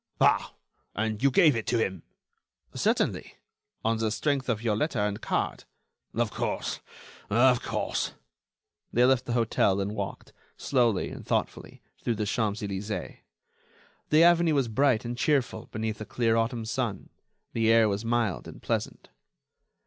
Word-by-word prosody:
"Ah!... -, -, +3 dB, 0.4 s
and 110 Hz, 0 st, -2 dB
you 140 Hz, -, +5 dB
gave 155 Hz, -1 st, +5 dB
it 115 Hz, -, -3 dB
to 120 Hz, -, +2 dB
him?" 95 Hz, -6 st, -1 dB, 0.7 s
"Certainly; -, -, 0 dB, 0.5 s
on 115 Hz, 0 st, +2 dB
the 110 Hz, -1 st, +1 dB
strength 135 Hz, +3 st, -1 dB
of 115 Hz, -2 st, -1 dB
your 110 Hz, -3 st, +1 dB
letter 140 Hz, +4 st, -1 dB
and 105 Hz, -1 st, -1 dB
card." -, -, -2 dB, 0.5 s
"Of -, -, 0 dB
course... -, -, -3 dB, 0.5 s
of 120 Hz, +3 st, +4 dB
course." -, -, -2 dB, 0.8 s
They 120 Hz, +1 st, +4 dB
left 130 Hz, -1 st, +3 dB
the 120 Hz, -, -1 dB
hotel 115 Hz, -4 st, +2 dB
and 100 Hz, +1 st, -1 dB
walked, 100 Hz, -3 st, -6 dB, 0.2 s
slowly 120 Hz, -7 st, +1 dB
and -, -, -8 dB
thoughtfully, -, -, -3 dB, 0.2 s
through 120 Hz, -, 0 dB
the 105 Hz, 0 st, -2 dB
Champs 110 Hz, 0 st, -1 dB
Elysées. 100 Hz, +1 st, -4 dB, 0.9 s
The 155 Hz, +2 st, +6 dB
avenue 170 Hz, -2 st, +5 dB
was 135 Hz, -4 st, +1 dB
bright 125 Hz, 0 st, +2 dB
and 120 Hz, +1 st, -3 dB
cheerful 135 Hz, 0 st, 0 dB
beneath 110 Hz, 0 st, -3 dB
a -, -, -4 dB
clear 115 Hz, -1 st, +1 dB
autumn 115 Hz, 0 st, 0 dB
sun; 115 Hz, -3 st, -3 dB, 0.4 s
the 115 Hz, 0 st, +3 dB
air 115 Hz, -1 st, +6 dB
was 100 Hz, +1 st, -2 dB
mild 115 Hz, -5 st, 0 dB
and -, -, -10 dB
pleasant. -, -, -3 dB
115 Hz, 150 wpm, -28 LUFS, 105-125 Hz, 0.9 s, The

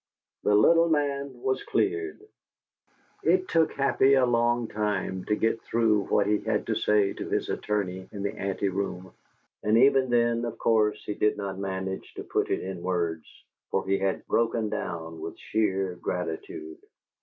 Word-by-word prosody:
The 105 Hz, -, +3 dB
little 165 Hz, +11 st, +5 dB
man 140 Hz, -4 st, -1 dB
was 130 Hz, 0 st, 0 dB
cleared. 395 Hz, 0 st, -1 dB, 1.0 s
It 375 Hz, 0 st, +2 dB
took 165 Hz, -1 st, +2 dB
Happy 140 Hz, 0 st, +3 dB
a 130 Hz, -1 st, +4 dB
long 120 Hz, -1 st, +2 dB
time 100 Hz, -3 st, -2 dB
to 105 Hz, -, +1 dB
get 115 Hz, +1 st, 0 dB
through 110 Hz, -3 st, +2 dB
what 100 Hz, -, +2 dB
he 105 Hz, 0 st, +2 dB
had 110 Hz, -1 st, -1 dB
to 115 Hz, -, 0 dB
say 105 Hz, -2 st, +2 dB
to -, -, -6 dB
his -, -, -1 dB
attorney 95 Hz, -3 st, -2 dB
in 100 Hz, -2 st, -6 dB
the 100 Hz, -, -1 dB
anteroom, 95 Hz, -1 st, -3 dB, 0.5 s
and 105 Hz, +2 st, +3 dB
even 135 Hz, +1 st, +5 dB
then, 120 Hz, -1 st, +2 dB
of 115 Hz, -1 st, -4 dB
course, 105 Hz, -2 st, +2 dB
he 105 Hz, -, -2 dB
did 105 Hz, +1 st, +1 dB
not 100 Hz, -2 st, -4 dB
manage 95 Hz, -1 st, -4 dB
to -, -, -6 dB
put -, -, -1 dB
it -, -, 0 dB
in 95 Hz, -2 st, -5 dB
words, 85 Hz, -3 st, -2 dB, 0.4 s
for 95 Hz, -, -1 dB
he 95 Hz, 0 st, +2 dB
had 95 Hz, -1 st, -1 dB
"broken 115 Hz, -2 st, +1 dB
down" 80 Hz, -5 st, -5 dB
with -, -, -6 dB
sheer 95 Hz, -4 st, 0 dB
gratitude. 360 Hz, -, -5 dB
105 Hz, 165 wpm, -27 LUFS, 95-125 Hz, 1.0 s, little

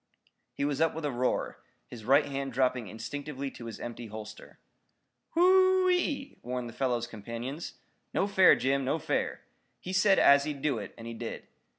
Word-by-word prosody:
He 140 Hz, -, -1 dB
was 145 Hz, +1 st, -1 dB
up 165 Hz, -1 st, +2 dB
with 160 Hz, -1 st, -4 dB
a 145 Hz, -, 0 dB
roar, 125 Hz, 0 st, -1 dB, 0.3 s
his 115 Hz, -3 st, -11 dB
right 140 Hz, +4 st, +5 dB
hand 135 Hz, -2 st, -4 dB
dropping 125 Hz, -2 st, +1 dB
instinctively 140 Hz, +6 st, -5 dB
to 120 Hz, -, -10 dB
his 115 Hz, -, -7 dB
empty 120 Hz, 0 st, -6 dB
holster. 110 Hz, 0 st, -10 dB, 0.8 s
"Wh -, -, -7 dB
o -, -, +5 dB
o 375 Hz, +1 st, +5 dB
o -, -, +4 dB
e!" 285 Hz, -6 st, -1 dB
warned 125 Hz, 0 st, -4 dB
the 115 Hz, -, -9 dB
fellow's 120 Hz, -3 st, 0 dB
companions. 120 Hz, +7 st, -6 dB, 0.4 s
"No 190 Hz, -, +1 dB
fair, 195 Hz, -2 st, +6 dB
Jim. 135 Hz, +1 st, 0 dB
No 130 Hz, -, 0 dB
fair. -, -, -2 dB, 0.4 s
He 185 Hz, -, -6 dB
said 195 Hz, +1 st, +4 dB
as 140 Hz, 0 st, +6 dB
he'd 150 Hz, -2 st, -5 dB
do 140 Hz, -7 st, +1 dB
it, 100 Hz, -, -8 dB
and 115 Hz, -, -10 dB
he 115 Hz, -, -5 dB
did. 115 Hz, 0 st, -6 dB
135 Hz, 195 wpm, -29 LUFS, 120-160 Hz, 0.8 s, fair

